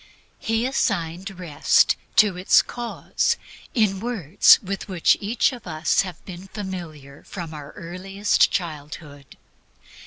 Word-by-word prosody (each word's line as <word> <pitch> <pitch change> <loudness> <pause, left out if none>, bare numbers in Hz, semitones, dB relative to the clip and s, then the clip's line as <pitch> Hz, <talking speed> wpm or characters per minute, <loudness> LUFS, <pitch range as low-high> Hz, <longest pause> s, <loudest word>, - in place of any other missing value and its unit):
He 225 +1 0
assigned 190 -8 -1
Rest 160 -5 +3 0.2
to 210 -4 +5
its 180 +1 +4
cause, 240 -1 -2 0.4
in 210 -5 +2
words 215 - +4
with 195 0 -5
which 185 -4 +3
each 220 +5 +1
of 240 -6 -10
us 155 -1 +1
has 185 -3 -6
been 185 0 -10
familiar 170 -9 -8
from 170 -4 -8
his 150 -2 -9
earliest 195 +3 0
childhood. 150 -5 -6
185 Hz, 120 wpm, -23 LUFS, 160-205 Hz, 0.4 s, to